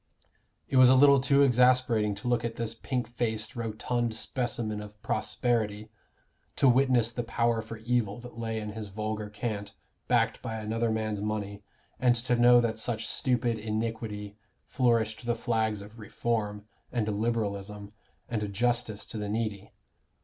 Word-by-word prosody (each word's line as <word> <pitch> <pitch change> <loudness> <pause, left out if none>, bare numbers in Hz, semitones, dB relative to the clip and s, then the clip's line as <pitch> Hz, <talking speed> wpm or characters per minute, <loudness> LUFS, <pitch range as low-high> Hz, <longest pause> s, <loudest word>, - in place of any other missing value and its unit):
It 135 - +1
was 130 -1 +8
a 130 - +7
little 140 0 +7
too 140 +1 +4
exasperating 125 -5 +3
to 125 - -7
look 120 -1 +1
at 115 -1 -3
this 115 -1 -3
pink 125 +2 -3
faced 110 0 -3
rotund 115 +1 -2
specimen 115 -3 -2
of 105 0 -11
prosperity, 110 -1 -1 0.6
to 140 - +4
witness 125 -2 +4
the 120 - -3
power 115 0 0
for 110 +1 -8
evil 115 -2 0
that 120 -1 -11
lay 115 -1 -3
in 105 -1 -5
his 110 0 -6
vulgar 105 +1 -4
cant, 105 -1 -4 0.3
backed - - +2
by 110 - -4
another 110 +1 -1
man's 110 -2 -1
money, 105 -1 -3 0.4
and 125 -1 +4
to 120 +1 0
know 120 0 +7
that 115 -2 0
such 115 0 -2
stupid 120 -3 0
iniquity 110 -1 -3 0.3
flourished 115 -3 +1
the 120 - +2
flags 110 -3 0
of 105 +3 -13
Reform, 105 -1 -2 0.3
and 115 -3 -1
Liberalism, 105 -2 -2 0.3
and 105 -3 -2
justice 120 0 0
to 110 - -6
the 105 -1 -3
needy. 105 -2 -3
115 Hz, 155 wpm, -29 LUFS, 105-120 Hz, 0.6 s, was